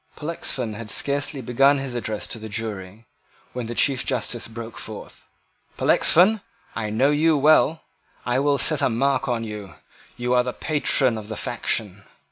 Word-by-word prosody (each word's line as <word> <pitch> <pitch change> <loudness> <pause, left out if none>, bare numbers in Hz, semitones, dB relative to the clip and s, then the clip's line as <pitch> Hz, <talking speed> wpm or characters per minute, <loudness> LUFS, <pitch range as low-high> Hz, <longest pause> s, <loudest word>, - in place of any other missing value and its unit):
Pollexfen 140 -7 -3
had 110 0 -7
scarcely 140 +3 0
begun 135 +4 +3
his 135 -2 -4
address 110 -3 -3
to 115 - -6
the 110 0 -8
jury, 105 -1 -6 0.5
when 125 -2 -4
the 120 - -5
Chief 135 0 +2
Justice 125 -2 -2
broke 115 -1 -8
forth: - - -9 0.5
"Pollexfen, 200 +5 +4 0.3
I 110 -2 -3
know 130 +7 +2
you 155 +1 +3
well. 155 +2 +4 0.4
I 125 +1 +1
will 140 0 +2
set 155 +1 +2
a - - +3
mark 135 +5 0
on 120 -2 -1
you. 105 -4 -7 0.4
You 125 0 -1
are 125 - +5
the 125 0 -4
patron 135 -6 +1
of 105 - -10
the 110 - -6
faction. 100 -3 -2
125 Hz, 165 wpm, -23 LUFS, 110-140 Hz, 0.5 s, are